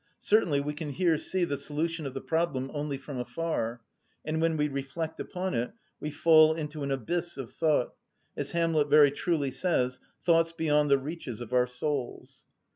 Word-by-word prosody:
Certainly 175 -10 +3
we 150 +1 -3
can 150 0 -5
here 170 +3 +2
see 185 -2 0
the 140 -4 -2
solution 160 +1 -2
of 135 - -8
the 135 - -3
problem 150 -5 -1
only 145 -2 -2
from 135 -1 -7
afar, 125 -2 -2 0.4
and 160 +1 -1
when 165 -1 +2
we 150 0 +2
reflect 140 +3 -4
upon 185 +1 -3
it 120 +9 -1 0.3
we 150 - -3
fall 155 +1 +6
into 150 -1 -5
an 140 - -2
abyss 170 +7 -2
of 130 -4 -6
thought—as 155 -6 -2
Hamlet 165 -3 +2
very 145 -1 +7
truly 145 -3 -1
says, 130 -7 0 0.3
"thoughts 165 -1 +4
beyond 150 -3 +2
the 140 - +6
reaches 135 -4 -6
of 120 0 -7
our 125 0 +4
souls." 130 0 -4
150 Hz, 175 wpm, -29 LUFS, 135-165 Hz, 0.4 s, very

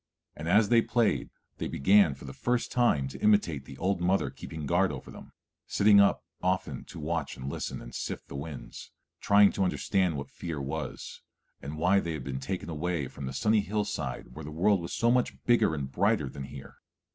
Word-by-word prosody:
And 75 - -6
as 105 +3 +4
they 120 -1 +6
played 115 -1 +1 0.3
they - - -2
began 95 -1 +4
for 70 - -12
the 70 - -7
first 120 -1 -1
time 120 - +2
to - - -9
imitate 90 -10 +2
the 65 - -11
old 90 +3 0
mother 95 +2 +1
keeping 80 -2 -7
guard 90 +4 +2
over 70 -3 -8
them, - - -12 0.4
sitting 100 0 +5
up 100 - +2 0.2
often 90 -7 -1
to - - -10
watch 80 -1 -3
and 65 0 -7
listen 70 - -4
and - - -11
sift - - -5
the - - -9
winds, 70 +1 -7 0.3
trying 100 0 +5
to 100 - -1
understand 90 -2 +1
what 70 - -6
fear 80 -4 -5
was, 70 +1 -5 0.4
and 75 +3 -6
why 90 +5 +4
they 85 -3 -3
had 75 -4 -5
been 65 0 -4
taken 75 +4 -4
away 85 -2 -2
from 65 +1 -7
the - - -4
sunny 110 +7 +3
hillside 100 - -3
where 80 - -8
the 75 - -7
world 90 +5 +2
was 85 - -6
so 115 +1 +3
much 125 0 0
bigger 120 -9 +3
and 70 -3 -4
brighter 100 0 +2
than 70 +1 -7
here. 70 0 -11
85 Hz, 205 wpm, -29 LUFS, 70-100 Hz, 0.4 s, they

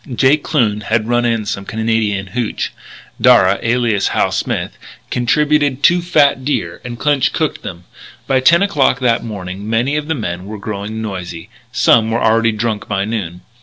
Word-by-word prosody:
Jake 135 +4 +2
Kloon 110 -9 0
had 110 +1 -1
run 120 0 +1
in 115 -2 0
some 100 -1 -3
Canadian 110 -2 -1
hooch; 120 -2 -2 0.5
Darragh, 95 +1 +5
alias 115 -3 +1
Hal - - 0
Smith, - - -2 0.4
contributed 145 +2 +1
two 175 +1 +4
fat 150 -6 +2
deer 145 +2 -2
and 120 -2 -6
Clinch 145 0 +1
cooked 155 -2 -2
them. 90 -2 -8 0.4
By 130 - +2
ten 170 +8 +5
o'clock 145 -10 +2
that 120 -3 +1
morning 100 -2 -6
many 120 +6 +1
of 150 0 -3
the 160 - -1
men 90 -7 -4
were 105 +1 -7
growing 105 +2 -5
noisy; 90 -3 -6 0.2
some 120 -3 +3
were 115 - 0
already 115 0 +3
drunk 110 -1 -3
by 100 -1 -1
noon. 95 -6 -4
115 Hz, 165 wpm, -16 LUFS, 105-130 Hz, 0.5 s, Darragh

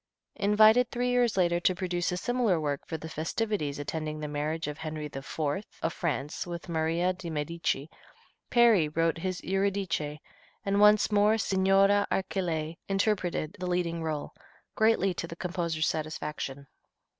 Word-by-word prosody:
Invited 215 +4 +5
three 245 +1 -1
years 245 -4 +2
later 175 -2 +3
to 180 +1 +2
produce 180 -1 -1
a 180 - -2
similar 235 -4 +1
work 145 -2 -3
for 160 - -3
the 160 - -8
festivities 160 -1 -2
attending 155 +1 -4
the 150 - -4
marriage 150 +3 -2
of 150 +1 -5
Henry 155 -1 -4
IV. 135 -2 -8 0.5
of 165 - 0
France 150 -1 -3
with 170 0 -6
Maria 165 +2 +1
di 180 -2 -7
Medici, 150 -2 -2 0.6
Peri 230 -10 +5
wrote 165 +1 0
his 185 +1 -3
"Eurydice," 190 -6 -1 0.5
and 200 0 +1
once 210 +1 +6
more 210 +1 +4
Signora 195 0 +3
Archilei 170 -4 -1
interpreted 195 -5 0
the 180 - -3
leading 175 -2 -1
rôle, 155 -2 -3 0.4
greatly 220 -4 +3
to 170 - -4
the 170 - -8
composer's 170 -3 -2
satisfaction. 150 -3 -3
175 Hz, 145 wpm, -29 LUFS, 155-195 Hz, 0.6 s, once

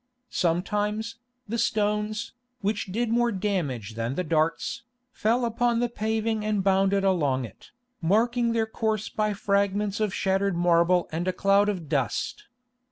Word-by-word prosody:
Sometimes, 210 +6 -1 0.3
the 230 +3 -2
stones, 210 +1 0 0.3
which 205 +1 -1
did 235 +3 0
more 240 0 +2
damage 170 - -2
than 115 +3 -3
the 180 - -1
darts, 160 +6 0 0.3
fell 240 +1 +1
upon 235 0 +1
the 240 0 +1
paving 220 -1 -1
and 210 -2 0
bounded 195 0 +3
along 145 -9 +1
it, 110 - -14 0.3
marking 235 +7 +2
their 225 -1 +1
course 220 -1 -2
by 215 -1 0
fragments 200 0 0
of 215 -2 +1
shattered 195 -1 0
marble 175 +1 +3
and 170 +3 -2
a - - +3
cloud 200 +2 +3
of 180 -6 -3
dust. 140 - -1
205 Hz, 145 wpm, -26 LUFS, 180-220 Hz, 0.3 s, bounded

